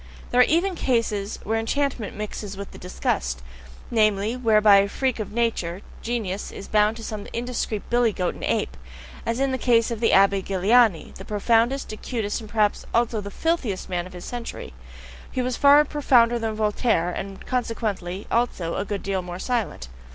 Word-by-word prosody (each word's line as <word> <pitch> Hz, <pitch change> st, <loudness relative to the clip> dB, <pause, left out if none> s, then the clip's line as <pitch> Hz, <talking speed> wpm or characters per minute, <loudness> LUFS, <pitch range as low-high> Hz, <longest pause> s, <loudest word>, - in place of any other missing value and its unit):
There 250 Hz, -, +5 dB
are -, -, +7 dB
even 350 Hz, +5 st, +2 dB
cases 230 Hz, -, -1 dB
where 225 Hz, +1 st, 0 dB
enchantment 255 Hz, -2 st, -2 dB
mixes 210 Hz, -1 st, -5 dB
with 200 Hz, 0 st, -7 dB
the -, -, -12 dB
disgust 65 Hz, -, -2 dB, 0.5 s
namely, 215 Hz, 0 st, +2 dB
where 225 Hz, -4 st, +3 dB
by 205 Hz, -1 st, +7 dB
a 195 Hz, 0 st, +4 dB
freak 260 Hz, +2 st, -1 dB
of 215 Hz, -, -4 dB
nature, 210 Hz, -6 st, -1 dB, 0.2 s
genius 215 Hz, -5 st, -3 dB
is 195 Hz, -, -9 dB
bound 210 Hz, +1 st, +2 dB
to 225 Hz, -, -9 dB
some 215 Hz, -2 st, -5 dB
such -, -, -12 dB
indiscreet 235 Hz, -3 st, -3 dB
billy 240 Hz, -1 st, +3 dB
goat 180 Hz, -3 st, -1 dB
and -, -, -11 dB
ape, -, -, -1 dB, 0.5 s
as 230 Hz, +2 st, 0 dB
in 275 Hz, 0 st, +1 dB
the 260 Hz, -, -2 dB
case 235 Hz, -1 st, +3 dB
of 230 Hz, -, -3 dB
the 225 Hz, -, +3 dB
Abbe 195 Hz, 0 st, +5 dB
Galiani, 195 Hz, +1 st, +3 dB
the 190 Hz, -, -10 dB
profoundest, 230 Hz, +5 st, +1 dB
acutest, 215 Hz, -1 st, -3 dB
and 215 Hz, -, -10 dB
perhaps 210 Hz, -2 st, +1 dB
also 230 Hz, -2 st, +1 dB
filthiest 205 Hz, -, -2 dB
man 175 Hz, -1 st, -2 dB
of 185 Hz, -, -14 dB
his 180 Hz, -1 st, -9 dB
century 240 Hz, -2 st, -6 dB, 0.6 s
he 255 Hz, -, -1 dB
was 250 Hz, -1 st, -1 dB
far 285 Hz, +3 st, +6 dB
profounder 245 Hz, -5 st, +3 dB
than 225 Hz, -1 st, -2 dB
Voltaire, 210 Hz, -4 st, +1 dB
and 195 Hz, +2 st, -6 dB
consequently 215 Hz, -6 st, -2 dB
also, 210 Hz, -8 st, 0 dB
a 200 Hz, -, -2 dB
good 205 Hz, -1 st, -4 dB
deal 195 Hz, -1 st, -1 dB
more 175 Hz, 0 st, -7 dB
silent. 220 Hz, -, -2 dB
220 Hz, 180 wpm, -24 LUFS, 195-240 Hz, 0.6 s, are